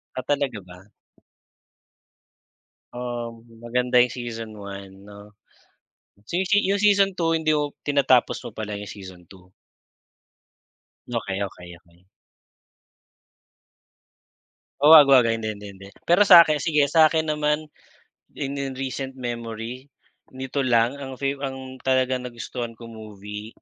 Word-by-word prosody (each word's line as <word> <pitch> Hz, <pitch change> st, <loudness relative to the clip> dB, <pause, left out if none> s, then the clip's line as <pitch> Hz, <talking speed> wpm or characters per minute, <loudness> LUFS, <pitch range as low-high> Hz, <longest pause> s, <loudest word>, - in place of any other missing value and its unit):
Ah, 130 Hz, -, -4 dB
talaga 140 Hz, -6 st, -1 dB
ba? 90 Hz, +3 st, -15 dB, 2.1 s
Um, 120 Hz, -2 st, -6 dB, 0.2 s
maganda 125 Hz, +1 st, +1 dB
yung 125 Hz, -, +5 dB
season 115 Hz, -3 st, -7 dB
1 100 Hz, -1 st, -10 dB
'no. 105 Hz, 0 st, -14 dB, 0.9 s
Se 175 Hz, -, -2 dB
se, 205 Hz, -, +4 dB
yung 200 Hz, +1 st, +1 dB
season 200 Hz, -2 st, +4 dB
2 165 Hz, -2 st, 0 dB
hindi 155 Hz, -1 st, +1 dB
mo 150 Hz, -1 st, 0 dB, 0.2 s
tinatapos 140 Hz, -3 st, +2 dB
mo -, -, -10 dB
pala 105 Hz, -2 st, -5 dB
yung 105 Hz, -, -8 dB
season 95 Hz, -4 st, -11 dB
2. 95 Hz, -1 st, -18 dB, 1.6 s
Okey, 95 Hz, -4 st, -3 dB
okey, 90 Hz, -2 st, -9 dB
okey. 90 Hz, +1 st, -28 dB, 2.7 s
Oo, 150 Hz, +2 st, +8 dB
wag, 145 Hz, -3 st, +9 dB
wag, 130 Hz, -3 st, +6 dB
hindi, 115 Hz, -1 st, -1 dB
hindi, 105 Hz, 0 st, -10 dB
hindi. 100 Hz, +1 st, -13 dB, 0.2 s
Pero 175 Hz, +4 st, +4 dB
sa'kin, 165 Hz, -6 st, +7 dB
sige 150 Hz, -3 st, +2 dB
sa 155 Hz, +2 st, +5 dB
akin 160 Hz, -1 st, 0 dB
naman, 150 Hz, +1 st, -1 dB, 0.7 s
in 140 Hz, 0 st, -4 dB
in 135 Hz, -1 st, -4 dB
recent 135 Hz, 0 st, -5 dB
memory 120 Hz, +1 st, -6 dB, 0.5 s
nito 130 Hz, +2 st, -4 dB
lang, 125 Hz, +1 st, +2 dB
ang 135 Hz, -1 st, -7 dB
favor 140 Hz, +1 st, -3 dB
ang 130 Hz, -1 st, -9 dB
talagang 130 Hz, -1 st, 0 dB
nagustuhan 120 Hz, 0 st, -6 dB
kong 115 Hz, 0 st, -12 dB
movie, 105 Hz, 0 st, -9 dB
125 Hz, 125 wpm, -23 LUFS, 105-140 Hz, 2.7 s, wag